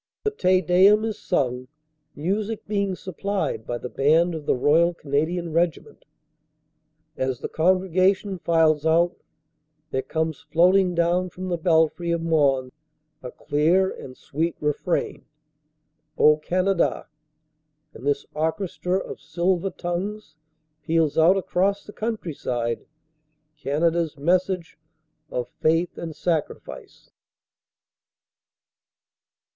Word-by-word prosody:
The 425 - +1
Te 185 - +2
Deum 190 +5 +5
is 215 -1 -4
sung, 125 -6 -1 0.5
music 205 +7 -2
being 200 -2 -1
supplied 185 - -3
by 120 - -2
the 125 - -6
band 160 +7 +2
of 155 -3 -7
the - - +3
Royal 165 +7 +3
Canadian 160 +3 -2
Regiment. 170 0 -1 1.1
As 130 -2 -1
the - - -3
congregation 185 +3 +1
files 160 -3 +2
out 170 +2 +3 0.8
there 130 - 0
comes 160 +1 -3
floating 180 +2 +3
down 175 +2 +1
from 185 +1 -7
the 175 - 0
belfry 165 +1 +2
of 170 -1 0
Mons 140 -6 +2 0.5
a 125 - -7
clear 170 +9 +1
and 130 -1 -10
sweet 165 +4 -2
refrain, 150 +4 -2 0.9
"O 150 0 +6
Canada," 185 +3 0 0.9
and 120 - -12
this 140 0 0
orchestra 180 +3 -1
of - - -6
silver 175 +4 0
tongues 180 +1 -5 0.5
peals 160 0 +1
out 170 +4 +5
across 195 +2 0
the 210 - -11
countryside 140 - -3 0.7
Canada 160 +3 0
s 160 -3 -3
message 180 +2 0 0.5
of 125 -1 -3
faith 165 +2 +1
and 165 -2 -6
sacrifice. 165 -3 -4
170 Hz, 110 wpm, -24 LUFS, 150-185 Hz, 1.1 s, O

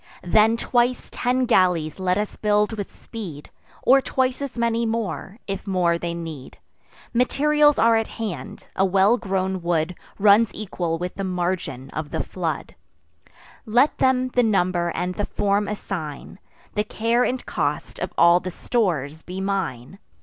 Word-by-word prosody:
Then 215 +5 +4
twice 245 +1 +1
ten 250 +1 +1
galleys 180 -8 +2
let 185 0 +1
us 210 0 -2
build 210 +1 +1
with 205 -3 -5
speed, 175 -11 -9 0.3
Or 270 +2 +6
twice 260 0 0
as 275 -3 -5
many 235 0 +1
more, 225 -3 -3
if 195 +1 -5
more 175 -3 +2
they 170 0 -3
need. 160 -6 -8 0.6
Materials 295 +4 +3
are 230 0 +5
at 225 0 +1
hand; 200 - -6
a 190 - +2
well 195 +4 +4
grown 190 -3 -2
wood 170 0 0 0.2
Runs 210 +2 +5
equal 175 -5 -3
with 180 +2 -4
the 195 - -5
margin 175 -8 -3
of 155 0 -4
the - - -2
flood: 170 -4 -4 0.9
Let 245 +7 +3
them 255 -1 +3
the 250 - +2
number 185 -6 +1
and 180 +1 -1
the 205 +2 -3
form 200 0 0
assign; 185 -6 -5 0.3
The 210 - +1
care 230 +3 +1
and 255 0 -1
cost - - -2
of - - -3
all 170 +1 +6
the 185 - -5
stores 165 - -1
be 185 +3 -7
mine. 190 -6 -3
195 Hz, 155 wpm, -23 LUFS, 175-230 Hz, 0.9 s, Or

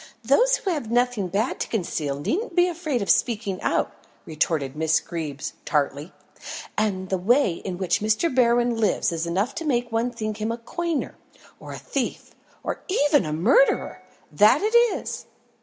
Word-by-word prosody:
"Those - - +4
who 395 -6 -2
have 290 -10 -3
nothing 240 -4 +1
bad 205 +8 -1
to - - -2
conceal 155 -9 -2
needn't 355 - -2
be 355 0 +5
afraid 315 - -2
of - - -6
speaking 210 -5 0
out," - - 0 0.3
retorted 150 -3 -1
Miss 160 +1 +2
Greeb 155 -5 -6 0.2
tartly. 145 +2 -1 0.6
"And 190 -3 -1
the 190 - 0
way 210 -2 +2
in 185 -2 -4
which 185 -1 0
Mr. 220 +9 +1
Berwin 240 -1 +3
lives 215 -5 +1
is 165 0 -3
enough 200 +10 -1
to 335 - -5
make 245 -5 0
one 230 +2 0
think 215 -3 -4
him 220 +2 -1
a 230 - -3
coiner, 330 +6 -3 0.5
or - - -10
a - - -6
thief, - - -4 0.3
or - - -3
even 295 - +2
a - - -3
murderer 225 - +2 0.3
that 215 - +5
it 435 +2 +1 0.2
is!" - - -6
225 Hz, 170 wpm, -24 LUFS, 175-275 Hz, 0.6 s, be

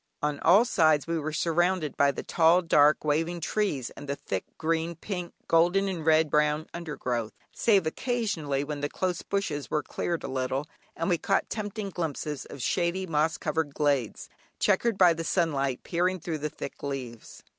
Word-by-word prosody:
On 150 -1 0
all 195 +8 +6
sides 155 - +3
we 165 0 -1
were 155 +1 -3
surrounded 170 0 +1
by 140 - +4
the 140 - -3
tall, 170 +2 +4
dark, 150 -2 +4
waving 165 +4 0
trees, 165 - -1
and 145 - -10
the 140 - 0
thick 95 -8 -4
green, 165 +1 -1
pink, 180 0 -5 0.2
golden, 175 +4 +3
and 180 -4 -3
red 155 -1 +4
brown 150 +1 +2
under 170 -3 -5
growth, 120 -3 -2 0.2
save 200 -7 +3
occasionally 160 - -1
when 145 0 -5
the 145 - -1
close 185 -2 -2
bushes 195 -8 -2
were 150 -1 0
cleared 170 +5 -3
a - - -3
little, 130 +1 -2 0.3
and 165 - -2
we 175 -2 +2
caught 195 - 0
tempting 205 -1 -4
glimpses 150 -4 -4
of 135 - -8
shady 180 +6 0
moss 160 -1 +1
covered 150 -2 -2
glades, 140 -7 0 0.3
chequered 210 +2 +2
by 180 -3 +6
the 165 0 -4
sunlight 140 -7 0
peering 180 +2 0
through 160 -1 -4
the 150 +1 -2
thick 140 - -8
leaves. 130 -5 -6
160 Hz, 175 wpm, -28 LUFS, 145-180 Hz, 0.3 s, all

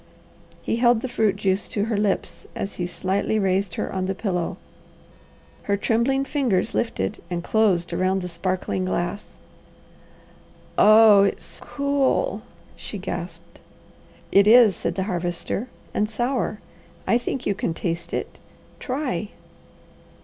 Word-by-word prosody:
He - - -1
held 240 -1 +4
the 260 - -3
fruit 220 -5 +1
juice 195 -1 0
to 205 -1 -1
her 225 -1 -1
lips 205 -1 -1
as 195 - -5
he 175 - -2
slightly 190 +4 -1
raised 190 -2 0
her - - -3
on 185 -1 -1
the 195 - -2
pillow. 185 -4 -2 1.1
Her 200 - +3
trembling 245 +6 +1
fingers 245 -9 0
lifted 95 - -2
and 175 -1 -3
closed 190 -6 +1
around 185 +2 0
the - - -3
sparkling 185 +2 -2
glass. 185 +2 -3 1.4
"Oh 215 -1 +7
it's 200 - -2
cool!" 280 - 0 0.3
she - - -7
gasped. - - -7 0.7
"It 200 +1 +5
is," 225 -4 +7
said 170 - -3
the 190 - -1
Harvester, 180 +4 -3 0.3
"and 210 0 0
sour! 235 -3 -1 0.5
I 235 - +3
think 250 +1 -4
you 200 - +1
can 200 -5 -3
taste 170 -1 -3
it. - - -4 0.4
Try!" 255 - -3
200 Hz, 135 wpm, -23 LUFS, 185-235 Hz, 1.4 s, Oh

